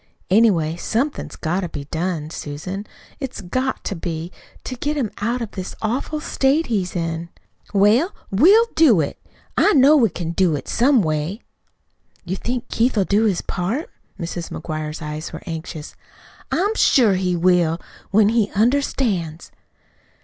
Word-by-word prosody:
Anyway, 185 -7 +4
somethin's 245 - -2
got 175 +3 -1
to 180 -3 -3
be 145 -3 -6
done, 160 -2 -2
Susan 185 +8 -6 0.3
it's 265 -4 -5
GOT 255 +8 -2
to 200 - -3
be 165 0 -4 0.3
to 255 - -5
get 295 +4 -2
him 240 -7 -1
out 235 +4 -1
of 220 - -7
this 185 -1 -6
awful 255 +7 -2
state 295 +1 +1
he's 195 -6 -2
in." 165 0 -3 0.4
"Well, 215 - +4 0.2
we'll 375 - +6
do 280 - +5
it. 145 - -2 0.4
I 415 - +4
know 285 +1 +7
we 240 -7 +4
can 170 -2 -4
do 170 -2 +2
it 145 - -6
some 250 -2 +3
way." 155 +7 -2 0.8
"You 185 - -2
think 245 +4 -3
Keith'll 230 -3 +2
do 210 +4 +2
his 195 -5 +1
part?" 215 - -3 0.3
Mrs. 170 -1 -4
McGuire's 155 0 -5
eyes 150 +1 -5
were 160 - -8
anxious. 160 -2 -6 0.6
"I'm 400 +6 +1
sure 245 - +4
he 185 -1 0
will 175 -1 +3 0.3
when 205 +1 +4
he 225 -2 +2
understands." 215 - 0
195 Hz, 150 wpm, -21 LUFS, 165-250 Hz, 0.8 s, know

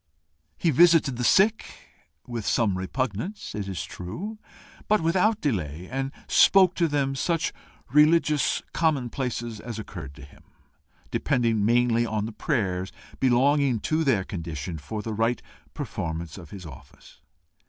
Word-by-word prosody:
He 165 - +2
visited 160 -3 +5
the 125 - -2
sick 200 - +4 0.6
with 120 -3 -5
some 105 -2 +1
repugnance, 130 - -3
it 105 -2 -4
is 95 -3 -4
true, 115 - -7 0.5
but 215 - +4
without 185 +7 +2
delay, 90 - -2
and 135 +1 -2 0.2
spoke 190 -2 +6
to 170 -2 +1
them 140 -2 0
such 165 +4 -1 0.4
religious 150 -1 +3
commonplaces 125 -6 -1
as 115 -1 -7
occurred 85 -10 -8
to 75 - -12
him, 70 - -16 0.7
depending 115 -4 +1
mainly 120 +1 +3
on 110 -2 -2
the 115 - -5
prayers 95 - -1 0.3
belonging 135 0 +3
to 155 +1 0
their 125 -10 +2
condition 80 -3 -5
for 105 +9 -6
the 110 - -4
right 115 +2 +1 0.4
performance 80 0 -4
of 85 -5 -11
his 95 0 -9
office. 70 -3 -14
120 Hz, 135 wpm, -26 LUFS, 95-150 Hz, 0.7 s, spoke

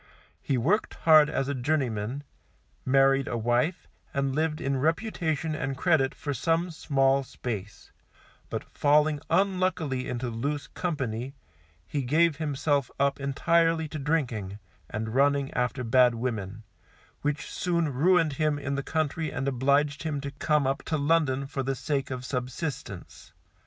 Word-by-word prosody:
He 135 - 0
worked 190 - +1
hard 155 -2 +6
as 135 -2 -1
a 140 - -1
journeyman, 130 -2 -1 0.6
married 135 0 +4
a 120 - -2
wife, 120 +9 0 0.3
and 140 -1 0
lived 155 +1 0
in 135 0 -1
reputation 160 0 -1
and 135 -3 -3
credit 145 -4 +2
for 145 -2 -4
some 165 +6 0
small 135 -3 +2
space; 110 -4 -6 0.6
but - - -3
falling 150 +1 +2
unluckily 185 -9 +1
into 125 0 -3
loose 140 +6 -2
company, 135 -6 -3 0.5
he 140 - -2
gave 155 +4 +2
himself 145 -2 0
up 140 0 +2
entirely 165 +4 +2
to 155 - -5
drinking, 125 -10 -1 0.3
and 110 +1 -4
running 140 +1 +2
after 125 +1 -1
bad 125 0 +4
women, 110 -3 -4 0.6
which 150 +2 -2
soon 170 -5 0
ruined 165 +2 +3
him 155 0 +1
in 140 0 -3
the 140 - -1
country 155 +1 -1
and 135 - -3
obliged 140 +2 +2
him 155 -3 -2
to 140 0 -5
come 150 0 +1
up 135 +1 0
to 160 - -2
London 145 -3 +2
for 135 0 -4
the 135 +1 -1
sake 140 -1 -2
of 130 -1 -5
subsistance. 130 +4 -5
140 Hz, 145 wpm, -27 LUFS, 130-155 Hz, 0.6 s, hard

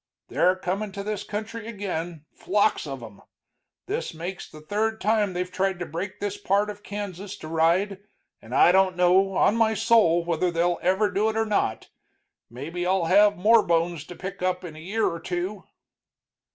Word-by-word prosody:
"They're 180 +1 +3
comin' 195 +3 -3
to 200 0 -5
this 210 -1 -3
country 220 +1 -6
ag'in, 175 -7 -5
flocks 205 -3 +1
of 135 -3 -6
'em. 110 -3 -12 0.6
This - - -4
makes 175 +4 -6
the 155 - -13
third 220 +7 -1
time 210 -2 +1
they've 180 0 -3
tried 190 0 0
to 175 - -4
break 175 +5 -5
this 205 0 -3
part 205 +1 +1
of 205 0 -12
Kansas 200 -1 -6
to 155 - -9
ride, 170 +5 +1 0.4
and 120 +3 -7
I 175 - +6
don't 190 -1 +3
know, 185 +2 +4
on 205 - +3
my 225 -1 +2
soul, 175 -7 +3
whether 170 +1 0
they'll 170 0 0
ever 190 +4 +2
do 215 +2 +1
it 220 - -3
or 225 - +2
not. 205 - -1 0.6
Maybe 155 +9 -5
I'll 185 -1 +1
have 205 +3 +5
more 220 +5 +5
bones 170 -3 0
to 175 - -10
pick 190 +1 -7
up 185 0 -1
in 165 -3 -8
a - - -10
year 210 +7 -1
or 170 - -3
two." 180 +3 -4
185 Hz, 185 wpm, -25 LUFS, 170-205 Hz, 0.6 s, I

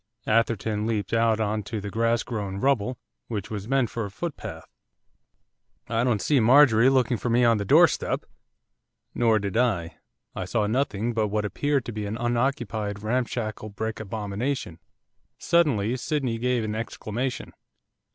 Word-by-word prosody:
Atherton 110 -1 +1
leaped 105 -3 -2
out 115 -1 +3
on 110 0 0
to 110 +2 -5
the 100 0 -6
grass 115 +2 +1
grown 100 -5 -4
rubble 125 0 +1 0.3
which 105 -4 -5
was 105 -1 -5
meant 135 -3 +1
for 115 - -3
a 100 - -4
footpath. 160 - -6 1.2
'I 115 +1 +1
don't 115 -6 +1
see 145 -3 +3
Marjorie 125 0 +6
looking 130 -3 +2
for 120 - -3
me 120 +2 +3
on 115 -2 +4
the 100 - -2
doorstep.' - - +3 0.9
Nor 115 -2 +3
did 100 -1 -2
I, 105 -9 0 0.4
I - - -4
saw 105 - 0
nothing 115 -1 0
but 110 -1 +1
what 105 +1 -1
appeared 140 +4 0
to - - -4
be 105 -2 -4
an 105 +3 -4
unoccupied 120 -4 -1
ramshackle 110 -2 -2
brick 110 +2 -4
abomination. 105 - -3 0.6
Suddenly 125 -10 +2
Sydney 130 -3 -2
gave 125 -1 +1
an 110 -1 -3
exclamation. 115 +3 -4
115 Hz, 150 wpm, -25 LUFS, 105-125 Hz, 1.2 s, Marjorie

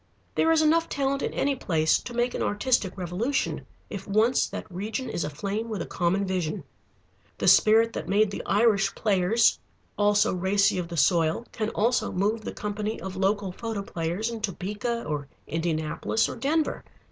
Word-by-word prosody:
There 325 - +3
is 320 -1 +4
enough 330 +2 +3
talent 275 0 -1
in - - -1
any 280 0 0
place 160 -9 +1
to 240 - -8
make 240 +1 +1
an - - -3
artistic 205 -2 0
revolution, 185 +10 -2 0.2
if 195 -1 -7
once 220 +5 +3
that - - -6
region 215 +8 -4
is - - -2
aflame 200 +10 -3
with 215 -3 -3
a - - -3
common 185 +3 0
vision. 180 -5 -2 0.7
The - - -1
spirit 225 +1 +5
that 160 - -5
made 205 +1 +3
the - - -4
Irish 200 -2 +3
Players, 210 +2 +2 0.4
all 205 0 +3
so 205 - +3
racy 190 +1 +2
of 175 - -3
the 170 -1 -6
soil, 165 - +2
can 215 -1 -2
also 235 +4 +1
move 210 +4 0
the - - -5
company 210 +1 -4
of 190 0 -6
local 195 0 0
photoplayers 200 -1 -3
in 230 -1 -6
Topeka, 210 +4 -3
or 145 -1 -3 0.2
Indianapolis, 160 +6 -1
or - - -5
Denver. 310 +3 0
205 Hz, 170 wpm, -26 LUFS, 180-230 Hz, 0.7 s, spirit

